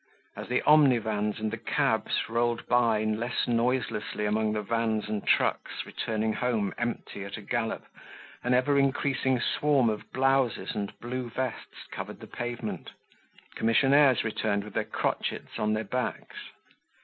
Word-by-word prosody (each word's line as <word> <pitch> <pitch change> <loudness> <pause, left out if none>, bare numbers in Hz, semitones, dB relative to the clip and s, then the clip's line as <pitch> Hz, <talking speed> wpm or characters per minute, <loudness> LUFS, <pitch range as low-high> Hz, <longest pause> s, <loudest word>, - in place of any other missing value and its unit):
As - - -7
the 125 - 0
omnivans 115 -8 +4
and 110 0 -2
the 115 - -4
cabs 115 - 0
rolled 120 0 0
by 115 -3 +3
less 110 +3 -1
noiselessly 115 -3 0
among 110 +1 +1
the 105 -1 -2
vans 110 0 0
and 105 -1 -3
trucks - - +1
returning 110 0 -2
home 115 -5 0
empty 120 -4 -3
at 100 +2 -6
a - - -8
gallop, 115 +1 -2 0.6
an 125 0 +2
ever 140 +3 +3
increasing 135 -1 +1
swarm 135 -3 +2
of 105 - -7
blouses 130 -7 +1
and 100 -1 -3
blue 125 0 -4
vests 130 +2 -5
covered - - -6
the - - -9
pavement. 120 -2 -5 0.6
Commissionaires 135 +2 +4
returned 105 -2 -1
with 105 -1 -10
their - - 0
crotchets - - -3
on 105 0 +1
their 110 +1 -1
backs. 125 +5 -3
115 Hz, 145 wpm, -28 LUFS, 110-125 Hz, 0.6 s, omnivans